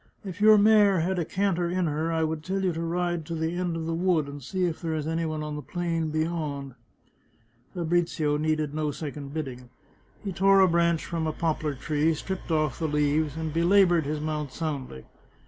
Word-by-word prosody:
If 190 0 -7
your 215 0 +8
mare 205 -3 +5
had 180 +2 0
a 170 - -1
canter 180 -2 0
in 180 0 0
her 155 +1 -1
I 160 -1 +1
would 160 -1 -2
tell 190 +3 -2
you 185 -2 +1
to 165 - -4
ride 175 0 -1
to 170 - -3
the 160 +1 -2
end 175 -1 -1
of 165 -1 -3
the 165 - -2
wood, 170 -3 +1
and 140 0 -8
see 185 +8 -3
if 170 -2 -3
there 165 -2 -2
is 155 -1 -2
any 165 +1 -1
one 155 -1 -3
on 150 0 -4
the 150 - -5
plain 165 +1 -2
beyond." 155 -4 -2 1.0
Fabrizio 165 -3 0
needed 155 -1 0
no 155 -1 -1
second 145 -1 -6
bidding. 130 -5 -6 0.5
He 200 - -3
tore 195 +2 +4
a 190 - +7
branch 170 -1 +2
from 165 -2 -2
a - - 0
poplar 155 -2 -1
tree, 155 +4 0
stripped 190 +4 -5
off 155 -3 0
the 160 - 0
leaves, 150 0 +1
and 160 -2 -3
belaboured 175 -2 +4
his 150 +1 -2
mount 150 -2 -3
soundly. 135 - -5
160 Hz, 205 wpm, -27 LUFS, 150-175 Hz, 1.0 s, your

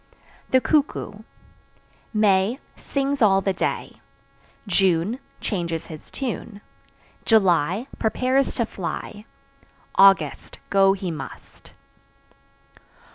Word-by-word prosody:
The 260 - +5
Cuckoo. 295 +2 0 0.9
May 210 +1 +2 0.2
sings 275 0 -2
all 195 -3 +5
the 195 0 0
day; 185 - -3 0.6
June 190 +3 +1 0.2
changes 170 -5 -3
his 155 - -12
tune; 230 -5 -5 0.6
July 190 - +3
prepares 255 +4 +1
to 235 - 0
fly; 205 +2 -6 0.7
August 195 0 +4
go 195 -1 +5
he 190 -3 -4
must. 155 - -10
200 Hz, 85 wpm, -23 LUFS, 190-240 Hz, 0.9 s, The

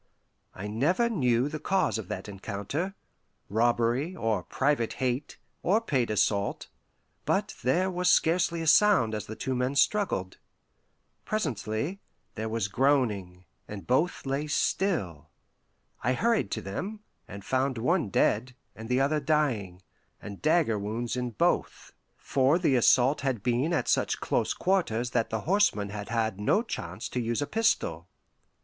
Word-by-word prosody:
I 95 - -6
never 150 - +1
knew 125 - +2
the 155 +1 -5
cause 165 -7 0
of 105 - -7
that 95 +2 -5
encounter 105 - -4 0.5
robbery, 120 - +1
or 115 - 0
private 135 -4 0
hate, 130 +1 -2 0.2
or 200 +5 +3
paid 135 - 0
assault; 100 -1 0 0.5
but - - 0
there 180 +10 +1
was 180 0 +1
scarcely 170 -1 +2
a - - -4
sound 165 - +5
as 105 -2 -4
the 110 - -6
two 130 - -3
men 125 +2 -1
struggled. 140 - +1 0.8
Presently, 145 - -2 0.3
there 110 0 -4
was 110 -3 -1
groaning, 100 -7 0 0.2
and 105 -2 -8
both 155 +8 0
lay 140 +3 -2
still. 125 - -1 0.7
I 125 - +2
hurried 230 - +1
to 110 - -4
them, 195 - -5 0.3
and 100 -1 -9
found 130 0 0
one 155 - +1
dead, 120 +6 +1 0.2
and 110 +1 -9
the 125 +1 +2
other 145 +3 +2
dying, 130 - 0 0.4
and 100 -2 -9
dagger 155 -9 +2
wounds 110 +4 -3
in 125 -1 -2
both, 115 - -1 0.2
for 135 +4 +2
the 165 -7 +2
assault 130 +3 +4
had 130 -7 -2
been 125 +6 +1
at 170 - 0
such - - +1
close - - 0
quarters 125 - 0
that 115 -2 0
the 110 -1 -2
horseman 170 - +2
had 105 0 -6
had 110 -3 -1
no 155 - +2
chance 130 - -5
to 125 - -3
use 120 +4 -1
a - - -2
pistol. 140 - 0
125 Hz, 150 wpm, -28 LUFS, 110-160 Hz, 0.8 s, sound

